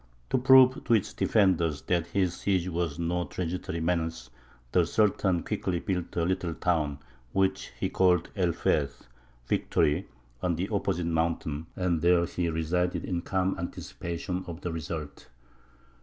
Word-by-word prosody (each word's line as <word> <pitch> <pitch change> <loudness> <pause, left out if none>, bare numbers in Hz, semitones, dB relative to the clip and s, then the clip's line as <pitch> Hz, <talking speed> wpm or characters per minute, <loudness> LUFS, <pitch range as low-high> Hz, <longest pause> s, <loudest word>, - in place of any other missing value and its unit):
To - - +3
prove 130 0 +6
to 115 - +4
its 105 - -1
defenders 85 -8 +2
that 85 -2 0
his 95 -2 +1
siege 95 -1 0
was 85 -4 -2
no 85 +1 -1
transitory 90 -2 -4
menace, 80 -6 -2 0.4
the 90 -2 +3
Sultan 95 -3 +2
quickly 95 -4 -2
built 90 -2 -3
a 85 - +1
little 90 -2 -1
town, 75 -5 0 0.4
which 95 0 0
he 95 - +1
called 90 -2 +2
El 90 -4 +2
Feth 70 -3 -1 0.4
("Victory"), 75 +8 +1 0.3
on - - +1
the - - -2
opposite 85 +1 -1
mountain, 80 -2 -1
and 90 -3 0
there 85 0 +4
he 85 0 -2
resided 85 +3 -1
in 90 -2 -2
calm 95 +1 0
anticipation 90 +1 -4
of 85 0 -7
the 85 - -3
result. 80 -4 -6
85 Hz, 145 wpm, -28 LUFS, 80-95 Hz, 0.4 s, prove